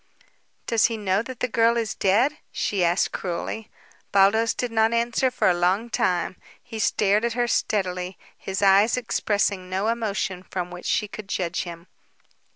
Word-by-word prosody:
"Does 230 -2 +3
he 230 -1 0
know 195 -1 +1
that 245 0 -9
the 250 - +1
girl 230 0 +3
is 225 -3 -1
dead?" 240 +10 +2
she 195 -3 -1
asked 175 +2 +2
cruelly. 195 +5 -4 0.4
Baldos 200 +4 +4
did 245 -2 -3
not 220 0 +2
answer 235 +2 +1
for 250 - 0
a 180 - +5
long 185 +7 0
time. 180 -2 0 0.3
He 225 -2 -8
stared 210 0 +2
at 235 0 0
her 240 0 0
steadily, 185 -5 -1 0.2
his 195 +1 -4
eyes 200 +5 +5
expressing 205 -5 -1
no 190 +4 0
emotion 205 -5 -2
from 180 -1 -5
which 180 0 -7
she 210 - +1
could 205 -1 -9
judge 175 -2 -2
him. 170 -1 -9
205 Hz, 165 wpm, -24 LUFS, 185-230 Hz, 0.4 s, a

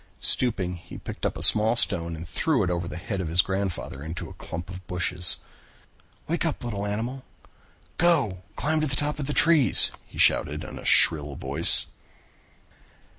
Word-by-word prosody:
Stooping, 95 -8 0
he 85 - -12
picked - - -5
up - - -6
a - - +2
small 110 +2 +7
stone 85 -7 -1
and 80 +1 -9
threw 135 - 0
it 90 - -1
over 85 -1 -3
the 85 - -7
head 95 +2 -5
of 90 - -4
his 85 +3 +3
grandfather 95 -7 -4
into 80 +3 -7
a - - -10
clump 85 +2 -8
of 90 -1 -11
bushes. 90 0 0 0.9
"Wake 170 +2 -2
up, 165 -5 -3
little 105 -4 -4
animal. 120 +6 -5 0.8
Go 170 -4 +3 0.2
and 105 - -33
climb 155 +1 -1
to 155 - -1
the 135 - -3
top 150 +1 -3
of 140 - -4
the - - -2
trees," 155 -5 +5 0.2
he - - -15
shouted - - +2
in - - -9
a - - -12
shrill 75 -3 +5
voice. 70 +5 0
100 Hz, 180 wpm, -25 LUFS, 85-135 Hz, 0.9 s, small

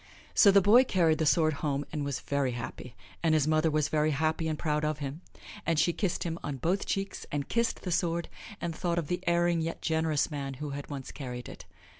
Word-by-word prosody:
So 205 - +7
the 200 0 +6
boy 225 +6 +7
carried 165 - +2
the 160 - +2
sword 155 0 +4
home 145 -1 -1
and 150 -2 -2
was 140 -2 -3
very 140 -3 0
happy, 120 +1 -7 0.3
and 160 -2 +3
his 150 -1 +2
mother 155 +1 +3
was 155 -1 +1
very 155 0 +1
happy 155 +2 0
and 155 -1 -1
proud 150 -1 -1
of 155 -1 0
him, 145 +2 -5 0.4
and 165 -1 0
she 170 +3 +3
kissed 190 -2 -1
him 170 -1 -3
on 145 -2 -3
both 175 +9 0
cheeks 195 0 -3
and 145 -1 -2
kissed 235 -1 0
the 180 - -3
sword 170 -1 0 0.3
and 170 -2 -3
thought 170 +1 -1
of 165 -4 -2
the 180 - -1
erring, 170 -1 +2
yet 165 +1 -3
generous 160 -2 +1
man 140 -2 -4
who 145 +1 -5 0.2
once 140 -3 -6
had - - -10
carried 125 -3 -6
it. - - -10
155 Hz, 225 wpm, -29 LUFS, 145-170 Hz, 0.4 s, So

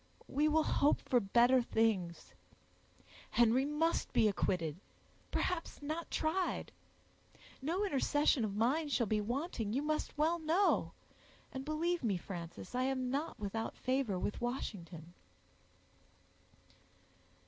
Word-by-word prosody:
We 295 +3 +2
will 310 +1 +3
hope 290 -1 +3
for 250 - +2
better 240 +5 +4
things. 215 -7 0 1.0
Henry 240 +3 +4
must 300 +3 0
be 220 - +5
acquitted; 170 -6 0 0.5
perhaps 360 -3 -2
not 310 +3 -4
tried. 345 +4 -1 0.9
No 345 +9 0
intercession 290 - +2
of 205 -2 -2
mine 275 +8 +1
shall 250 -4 +2
be 215 0 +1
wanting, 240 - -2
you 275 +4 0
must 305 0 -2
well 325 +3 +2
know; 330 +5 +2 0.6
and 265 - -5
believe 325 +3 -1
me, 205 -5 +1
Frances, 175 +1 -8
I 250 - 0
am 260 -1 -1
not 290 +4 -2
without 215 +2 -3
favor 255 -6 0
with 205 +5 -3
Washington." 175 - -5
260 Hz, 120 wpm, -35 LUFS, 215-310 Hz, 1.0 s, be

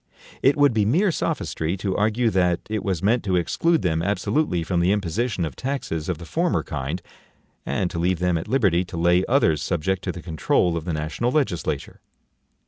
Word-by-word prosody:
It 135 +2 +4
would 145 -3 +4
be 110 -2 +2
mere 170 - +3
sophistry 85 - -2
to 95 0 -2
argue 110 +3 +1
that 90 -3 +2
it 110 -2 -1
was 95 -4 -2
meant 115 +4 +2
to 95 -2 +1
exclude 160 - +1
them 80 -2 +1
ABSOLUTELY 100 - 0
from 85 +1 0
the 90 +2 +3
imposition 100 0 -1
of 80 - -6
taxes 125 - -3
of 90 - -1
the 85 - -9
former 170 - 0
kind, 75 +4 -4 0.6
and 90 - -1
to 85 - -4
leave 90 +1 +1
them 90 0 +1
at 80 - -3
liberty 100 -8 +2
to 85 - -8
lay 85 +2 +3
others 100 - +3
SUBJECT 95 +2 -1
TO 90 - -2
THE 90 - -9
CONTROL 85 +1 +1
of 80 -1 -4
the 85 - -2
national 75 +10 -1
legislature. 130 - -2
90 Hz, 195 wpm, -23 LUFS, 85-115 Hz, 0.6 s, It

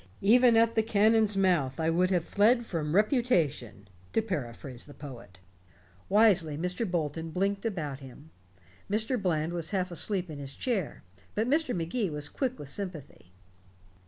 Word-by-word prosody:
Even 235 +3 +5
at 230 0 +4
the 220 - +3
cannon's 215 -1 +3
mouth 170 -9 +1
I 160 0 +1
would 180 +2 +2
have 175 -3 0
fled 235 +4 +3
from 160 -5 -3
reputation, 170 - +1 0.3
to - - +3
paraphrase 130 - -6
the 145 - -14
poet." 125 - -11 0.7
Wisely 190 -8 +4
Professor 180 +7 -1
Bolton 165 -2 -2
blinked 195 +5 -1
about 150 -10 -4
him. 140 +3 -13 0.6
Mr. 220 +3 0
Bland 165 -3 0
was 170 -2 -2
half 185 -2 -1
asleep 185 +2 +1
in 145 - -7
his 140 -1 -4
chair, 215 - -2 0.3
but 220 +2 0
Mr. 295 -1 +1
Magee 180 +5 -1
was 150 -1 -3
quick 260 -2 -2
with 140 - -8
sympathy. 150 - -6
180 Hz, 155 wpm, -29 LUFS, 150-215 Hz, 0.7 s, Even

